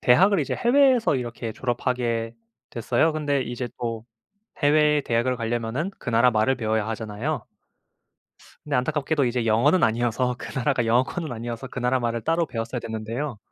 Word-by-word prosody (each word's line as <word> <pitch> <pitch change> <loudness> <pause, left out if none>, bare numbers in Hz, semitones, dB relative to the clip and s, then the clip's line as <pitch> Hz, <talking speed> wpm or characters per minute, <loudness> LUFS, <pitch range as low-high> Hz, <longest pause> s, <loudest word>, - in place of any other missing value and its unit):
대학을 190 +11 +5
이제 - - -2
해외에서 250 - +4
이렇게 120 -2 -5
졸업하게 120 -2 -2 0.4
됐어요. 120 +7 +1
근데 145 -3 0
이제 120 +1 -4
또 115 -2 -4 0.6
해외의 150 0 +4
대학을 120 +2 0
가려면은 120 +7 -2
그 - - -8
나라 115 +2 +5
말을 110 +4 +2
배워야 110 -2 -1
하잖아요. 110 +5 -3 1.2
근데 145 -2 0
안타깝게도 145 +2 0
이제 120 -1 0
영어는 120 +11 +3
아니어서 120 +2 +1
그 - - -8
나라가 125 -2 +1
영어권은 130 +6 0
아니어서 120 +2 -5
그 125 - -6
나라 125 +1 +2
말을 115 -1 -1
따로 165 +1 +1
배웠어야 115 -1 -4
됐는데요. 115 +3 -4
125 Hz, 395 characters per minute, -24 LUFS, 115-145 Hz, 1.2 s, 대학을